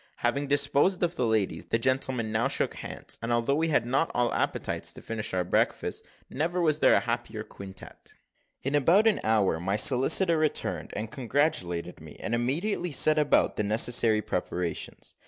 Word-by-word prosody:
Having 140 0 0
disposed 145 +6 +2
of 175 0 0
the 125 - 0
ladies, 110 -3 -1
the - - +1
gentlemen 130 -2 0
now 110 +2 +1
shook - - -1
hands, - - -8
and 115 +1 -3
although 120 +3 +1
we 160 +3 +1
had 145 -7 +1
not 135 +7 0
all 120 -1 +1
appetites - - -2
to - - -12
finish 110 -1 -3
our 90 -1 0
breakfasts, 90 - -1 0.3
never 165 +6 -2
was 155 -3 +1
there - - +5
a - - +3
happier 115 -2 -4
quintette. 95 -2 -11 0.5
In 135 - -2
about 165 - +4
an 225 - +3
hour 105 -7 +2
my 95 +4 -1
solicitor 140 - +4
returned, 155 -1 -1
and 110 +1 -4
congratulated 115 - -1
me, 80 -1 -12
and 115 - -4
immediately 165 - -1
set 155 +2 +4
about 150 -1 +2
the - - +1
necessary 110 0 +2
preparations. 85 -3 -4
125 Hz, 175 wpm, -27 LUFS, 110-150 Hz, 0.5 s, there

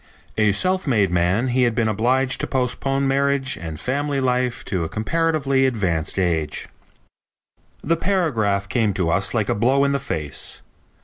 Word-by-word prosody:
"A 105 -1 +3
self 185 - +1
made 105 -8 +2
man, 90 +8 +1
he 125 +1 +1
had 120 -3 +2
been 115 -1 +1
obliged 125 +5 +1
to - - -2
postpone 135 +1 0
marriage 140 -1 +1
and 80 -2 -7
family 140 +2 -1
life 125 -2 -1
to 90 -4 -2
a 80 - -4
comparatively 140 +2 +1
advanced 95 -10 -1
age." 85 -5 -1 1.2
The 165 +3 +1
paragraph 120 - 0
came 105 0 0
to 85 -4 +1
us 95 +5 0
like 110 -3 +1
a - - +1
blow 130 +6 +2
in 140 - +2
the 140 - 0
face. 80 - -4
125 Hz, 165 wpm, -22 LUFS, 100-135 Hz, 1.2 s, A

